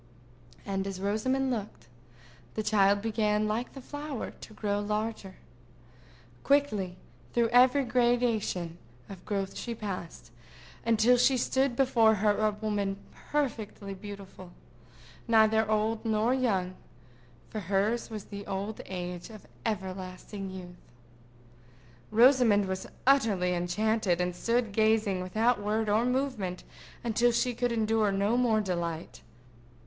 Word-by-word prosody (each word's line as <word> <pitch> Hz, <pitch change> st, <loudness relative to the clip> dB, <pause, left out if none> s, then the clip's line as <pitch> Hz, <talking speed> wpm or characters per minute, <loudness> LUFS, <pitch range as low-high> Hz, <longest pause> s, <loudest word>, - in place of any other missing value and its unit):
And 195 Hz, -1 st, -2 dB
as 195 Hz, -1 st, -5 dB
Rosamond 260 Hz, +7 st, 0 dB
looked, 200 Hz, -, -5 dB, 0.7 s
the 215 Hz, -, -1 dB
child 200 Hz, -1 st, +3 dB
began, 215 Hz, -1 st, +1 dB
like 225 Hz, +4 st, -2 dB
the 270 Hz, -, -9 dB
flower, 290 Hz, -1 st, -5 dB
to 215 Hz, -, -13 dB
grow 205 Hz, -1 st, -1 dB
larger. 210 Hz, -2 st, -3 dB, 1.1 s
Quickly 215 Hz, -11 st, +1 dB, 0.4 s
through 235 Hz, -1 st, +2 dB
every 255 Hz, +3 st, +5 dB
gradation 235 Hz, -8 st, +1 dB, 0.3 s
of 190 Hz, -3 st, -10 dB
growth 195 Hz, -2 st, -2 dB
she 235 Hz, -1 st, -4 dB
passed, 180 Hz, -, -6 dB, 0.6 s
until 230 Hz, +2 st, +5 dB
she 250 Hz, +2 st, +4 dB
stood 260 Hz, +1 st, +1 dB
before 235 Hz, -4 st, +4 dB
her 210 Hz, 0 st, +2 dB
a 215 Hz, 0 st, +3 dB
woman 205 Hz, -2 st, -2 dB, 0.3 s
perfectly 220 Hz, -8 st, -2 dB
beautiful, 195 Hz, -2 st, -10 dB, 0.7 s
neither 220 Hz, -1 st, +4 dB
old 215 Hz, +1 st, 0 dB
nor 220 Hz, +2 st, +2 dB
young; 195 Hz, -9 st, 0 dB, 0.8 s
for 215 Hz, -, -3 dB
hers 205 Hz, +5 st, 0 dB
was 215 Hz, -3 st, -6 dB
the 200 Hz, -1 st, -9 dB
old 200 Hz, +3 st, -4 dB
age 180 Hz, 0 st, -5 dB
of 215 Hz, -2 st, -12 dB, 0.2 s
everlasting 190 Hz, -1 st, -5 dB
youth. 180 Hz, -2 st, -11 dB, 1.2 s
Rosamond 230 Hz, -3 st, +5 dB
was 190 Hz, 0 st, -4 dB, 0.2 s
utterly 215 Hz, -10 st, +3 dB
enchanted, 180 Hz, +1 st, 0 dB
and 180 Hz, 0 st, -1 dB
stood 230 Hz, +3 st, 0 dB
gazing 215 Hz, -3 st, +2 dB
without 220 Hz, +5 st, +1 dB
word 215 Hz, +1 st, 0 dB
or 215 Hz, +3 st, +3 dB
movement 250 Hz, -9 st, -2 dB, 0.4 s
until 240 Hz, +1 st, +2 dB
she 245 Hz, +1 st, +1 dB
could 245 Hz, +1 st, -1 dB
endure 220 Hz, -2 st, +2 dB
no 200 Hz, +4 st, +1 dB
more 235 Hz, -3 st, +3 dB
delight. 170 Hz, -4 st, -4 dB
215 Hz, 125 wpm, -29 LUFS, 195-235 Hz, 1.2 s, every